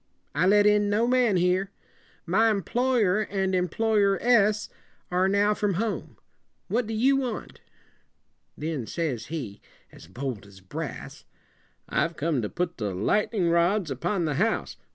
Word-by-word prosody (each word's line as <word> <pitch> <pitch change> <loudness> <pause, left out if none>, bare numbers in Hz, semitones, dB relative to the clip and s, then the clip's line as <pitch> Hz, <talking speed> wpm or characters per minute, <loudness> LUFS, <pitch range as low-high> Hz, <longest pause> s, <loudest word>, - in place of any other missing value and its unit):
I 165 +5 +2
let 205 +1 +5
in 210 0 +4
no 215 +3 +2
man 245 -5 +3
here. 180 +2 +1 0.6
My 215 +6 +3
em 200 -3 0
ploy 250 -1 +1
er 190 +3 +2
and 195 -2 -1
employ 210 +5 +1
er 195 -1 +3
ess 215 -3 +3 0.4
are 180 +1 +2
now 200 +2 +3
from 205 -2 -1
home. 220 +3 -3 0.5
What 235 -1 0
do 225 - -4
you 265 +5 +3
want?" 250 -5 -4 1.0
Then 150 -7 -4
says 140 -9 -3
he, 125 -11 -6 0.3
as - - -14
bold 115 +1 -5
as 100 -1 -15
brass, 95 0 -7 0.6
"I've 170 0 0
come 150 -4 0
to 105 - -3
put 175 -1 -3
the 105 -4 -3
light 160 - +1
en 215 -4 -1
ing 170 - +2
rods 170 0 +2
upon 170 +7 -1
the 150 - -1
house. 225 +1 0
190 Hz, 165 wpm, -26 LUFS, 160-215 Hz, 1.0 s, let